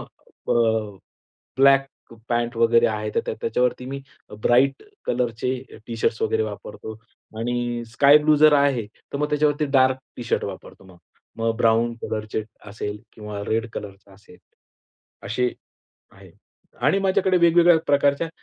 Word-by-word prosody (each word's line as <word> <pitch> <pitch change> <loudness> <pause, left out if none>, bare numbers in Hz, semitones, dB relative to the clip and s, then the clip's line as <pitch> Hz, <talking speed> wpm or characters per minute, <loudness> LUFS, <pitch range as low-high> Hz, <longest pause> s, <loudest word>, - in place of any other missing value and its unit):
अ, - - -8 1.0
black 135 0 +5 0.4
pant 120 0 -1
वगैरे 115 0 +4
आहे, 110 -1 -2
तर - - -1
त्याच्यावरती 125 +2 0
मी 135 +1 -5 0.4
ब्राइट 135 +3 +3 0.2
कलरचे 120 0 -1 0.3
टी 115 - -6
शर्ट्स 115 - 0
वगैरे 445 0 +1
वापरतो 445 - -7 0.4
आणि 120 0 -2
स्काय 140 +4 +6
ब्लू 150 0 +3
जर 155 +1 +6
आहे, 140 -6 +2 0.3
तर - - -2
मग 150 +1 0
त्याच्यावरती 150 0 +1
डार्क 130 0 +4 0.2
टी - - -6
शर्ट - - -1
वापरतो - - -9
मग. 95 -2 -16 0.4
मग 115 0 0
ब्राउन 115 0 +2
कलरचे 110 0 -3 0.3
असेल 105 0 -5
किंवा 105 -1 -7
रेड 115 +1 -1
कलर 100 -2 -7 0.2
असेल. 100 +2 -18 0.9
असे 125 0 -1 0.6
आहे. - - -16 0.6
आणि 195 - +3
माझ्याकडे 190 -1 +2
वेगवेगळ्या 170 0 +5
प्रकारच्या 140 +3 +2
125 Hz, 135 wpm, -23 LUFS, 115-145 Hz, 1.0 s, स्काय